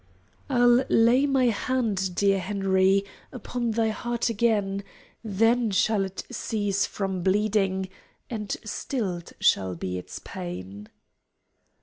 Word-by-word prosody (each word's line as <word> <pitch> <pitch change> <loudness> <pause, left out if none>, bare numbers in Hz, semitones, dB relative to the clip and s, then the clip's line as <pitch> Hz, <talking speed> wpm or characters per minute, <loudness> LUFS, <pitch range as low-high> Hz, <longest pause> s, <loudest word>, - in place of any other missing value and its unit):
"I'll 245 -1 +5
lay 240 +5 +4
my 270 -2 +2
hand, 210 -5 -1
dear 195 0 +3
Henry, 195 0 +2 0.3
Upon 245 -1 -3
thy 225 0 +1
heart 235 +2 -2
again. 205 -3 +1 0.4
Then 225 +3 +2
shall 205 +1 +2
it 190 0 -6
cease 205 -4 -1
from 195 -2 -3
bleeding. 195 0 +1 0.4
And 210 -4 -5 0.2
stilled 200 -6 -4
shall 95 -2 +2
be 90 +1 -4
its - - -9
pain." 95 +4 -7
205 Hz, 110 wpm, -26 LUFS, 190-230 Hz, 0.4 s, I'll